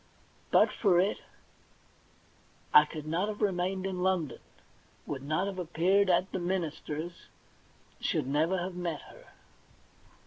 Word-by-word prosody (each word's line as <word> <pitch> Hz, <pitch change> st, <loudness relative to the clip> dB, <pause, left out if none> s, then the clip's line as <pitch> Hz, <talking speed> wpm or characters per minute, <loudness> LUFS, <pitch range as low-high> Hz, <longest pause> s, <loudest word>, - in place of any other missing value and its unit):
But -, -, +5 dB
for 185 Hz, -5 st, +3 dB
it 195 Hz, +3 st, +1 dB, 1.5 s
I 150 Hz, -, +9 dB
could 150 Hz, 0 st, -8 dB
not 170 Hz, +6 st, 0 dB
have 215 Hz, -1 st, -5 dB
remained 190 Hz, -1 st, 0 dB
in 185 Hz, -2 st, -3 dB
London, 180 Hz, -5 st, 0 dB, 0.7 s
would 135 Hz, -3 st, -4 dB
not 155 Hz, +7 st, 0 dB
have 195 Hz, -2 st, -4 dB
appeared 180 Hz, +4 st, +2 dB
at 180 Hz, +2 st, +2 dB
the 190 Hz, -, -2 dB
minister's, 170 Hz, -2 st, -4 dB, 0.8 s
never 150 Hz, +7 st, +1 dB
should -, -, -1 dB
have 185 Hz, -, -5 dB
met 175 Hz, -4 st, -3 dB
her. -, -, -15 dB
180 Hz, 130 wpm, -30 LUFS, 155-190 Hz, 1.5 s, I